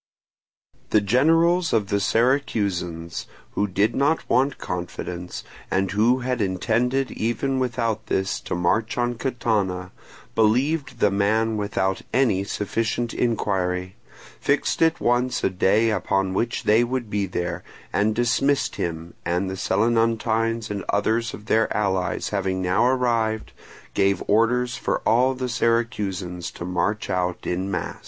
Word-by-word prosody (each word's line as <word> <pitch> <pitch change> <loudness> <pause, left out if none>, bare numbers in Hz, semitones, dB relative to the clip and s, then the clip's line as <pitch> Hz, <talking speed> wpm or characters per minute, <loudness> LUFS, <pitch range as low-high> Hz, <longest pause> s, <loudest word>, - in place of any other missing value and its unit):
The 110 - +4
generals 165 - +3
of 105 -4 +1
the 100 - +1
Syracusans, 100 - 0 0.2
who 105 - 0
did 100 +3 +1
not 150 +4 +1
want 135 +2 +2
confidence, 90 0 -5 0.3
and 95 0 0
who 115 +6 +3
had 125 -1 -1
intended 120 +7 0
even 130 +4 -1
without 115 -3 -1
this 95 0 0
to - - -2
march 90 +6 0
on 120 0 +1
Catana, 105 -8 -1 0.4
believed 130 +4 +1
the 105 - +4
man 110 +3 +1
without 100 -2 -1
any 115 -7 +2
sufficient 115 +4 -2
inquiry, 95 -5 -1 0.4
fixed 140 +1 0
at 165 0 +3
once 120 +1 +1
a - - +2
day 105 +5 +3
upon 95 -2 0
which 115 +4 -1
they 110 +3 +4
would 125 -1 -2
be 100 -1 0
there, 90 -1 -3 0.3
and 105 +1 +2
dismissed 135 +4 +1
him, 85 0 -4
and 90 +2 -1
the - - -4
Selinuntines 115 +1 +1
and 100 -2 -3
others 110 +3 +1
of 105 - -13
their 110 0 +2
allies 95 -3 0
having 95 -2 -1
now 95 +5 +2
arrived, 115 -4 0 0.4
gave 100 -1 +2
orders 120 +3 +2
for - - -1
all 130 +3 +3
the 130 0 -3
Syracusans 105 -7 -1
to 85 - -6
march 100 +4 -1
out 90 -1 -2
in 95 +2 -2
mass. 90 -4 -3
110 Hz, 135 wpm, -23 LUFS, 95-120 Hz, 0.4 s, The